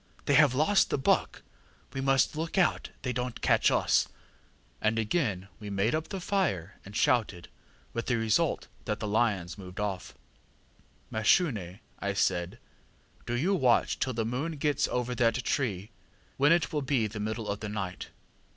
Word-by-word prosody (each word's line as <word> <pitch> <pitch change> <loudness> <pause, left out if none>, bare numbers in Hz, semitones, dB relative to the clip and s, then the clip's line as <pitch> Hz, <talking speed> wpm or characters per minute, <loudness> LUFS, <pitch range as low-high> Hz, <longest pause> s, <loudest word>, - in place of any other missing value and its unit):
They 145 - +2
have 140 -2 +5
lost 165 +8 +3
the - - 0
buck; 135 - +1 0.5
we 135 - -3
must 135 +2 +2
look 160 +4 -3
out 185 -4 +2
they 125 - -1
donŌĆÖt 125 0 -4
catch - - +4
us. - - +2
ŌĆÖ - - -27 0.7
And 110 +1 +1
again 105 - 0
we 105 -2 -7
made 100 +3 +1
up 155 +1 -1
the 195 - -4
fire, 170 - -1
and 100 +1 -11
shouted, 105 -8 +1 0.4
with 115 - -3
the 125 - +2
result 110 -2 +1 0.2
that 105 0 -2
the 105 - -3
lions 100 -5 0
moved 90 0 -9
off. 100 -3 -3 1.0
ŌĆ£ŌĆśMashune, 135 - +3
ŌĆÖ 95 -1 -7 0.2
I 100 0 -1
said, 90 -3 0 0.7
ŌĆśdo 120 0 -1
you 190 +5 +2
watch 130 -10 +2
till 130 - 0
the 115 -1 -1
moon 135 +8 -2
gets 145 -1 0
over 125 0 -2
that 115 -1 +2
tree, 110 - -1 0.5
when 145 +3 +4
it 170 -3 +2
will 150 - 0
be 135 -4 +1
the 105 +1 -5
middle 110 +1 -3
of 100 0 -2
the 105 - -5
night. 95 -4 -4
115 Hz, 175 wpm, -29 LUFS, 105-140 Hz, 1.0 s, have